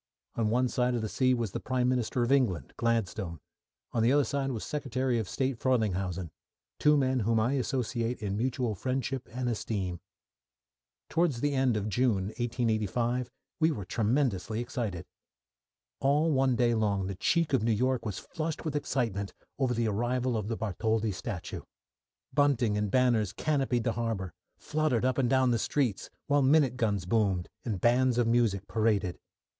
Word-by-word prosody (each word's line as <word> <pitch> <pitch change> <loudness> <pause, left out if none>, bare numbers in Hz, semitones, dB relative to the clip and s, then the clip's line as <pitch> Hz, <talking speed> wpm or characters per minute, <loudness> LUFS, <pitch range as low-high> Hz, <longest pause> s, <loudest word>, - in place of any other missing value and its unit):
On 110 -2 0
one 125 +3 +2
side 125 0 0
of 115 - -2
the - - -1
sea 130 +4 +2
was 115 -5 -2
the - - -3
Prime 125 -1 0
Minister 125 -1 0
of 120 - 0
England, 100 - +1
Gladstone; 110 -7 -1 0.5
on 115 - 0
the 115 +3 +4
other 145 +1 +4
side 135 +2 -1
was 115 -5 -3
Secretary 130 -4 -1
of 110 - -4
State 130 -3 -1
Frelinghuysen; 95 - 0 0.5
two 150 0 +5
men 130 -2 +2
whom 115 +1 +2
I 120 +5 +1
associate 125 -3 -1
in 100 -2 -2
mutual 120 0 -1
friendship 130 +3 -3
and 125 +1 -3
esteem. 100 -6 -2 1.1
Towards 165 -7 +1
the 145 0 +1
end 130 -4 +2
of 105 0 -2
June, 105 -3 +1
1885, 120 +1 0 0.3
we 160 0 +4
were 105 - -3
tremendously 110 -1 0
excited. 120 - -3 0.9
All 150 +4 +3
one 135 -2 +3
day 120 -1 +3
long 100 -4 +1
the 100 - -3
cheek 165 - +1
of 130 - +4
New 115 +1 +1
York 130 +3 +1
was 105 -5 -4
flushed 160 0 -4
with 155 -2 -2
excitement 115 -9 -1 0.3
over 130 -3 +1
the 115 0 +1
arrival 120 +4 0
of 105 -2 -2
the 115 0 -2
Bartholdi 110 +1 0
statue. 90 0 -5 0.7
Bunting 135 -7 +2
and 105 0 0
banners 120 -5 +2
canopied 135 -6 0
the 115 - +1
harbour, 110 -6 -3 0.2
fluttered 150 -6 0
up 130 0 +1
and 125 -3 +2
down 130 -1 +3
the 115 - +1
streets, 120 -5 -1 0.2
while 145 0 +3
minute 135 -2 +4
guns 105 -6 0
boomed, 95 -3 +1
and 105 -6 -2
bands 120 +3 +3
of 120 - +3
music 115 -4 +1
paraded. 105 -5 0
120 Hz, 170 wpm, -29 LUFS, 105-130 Hz, 1.1 s, two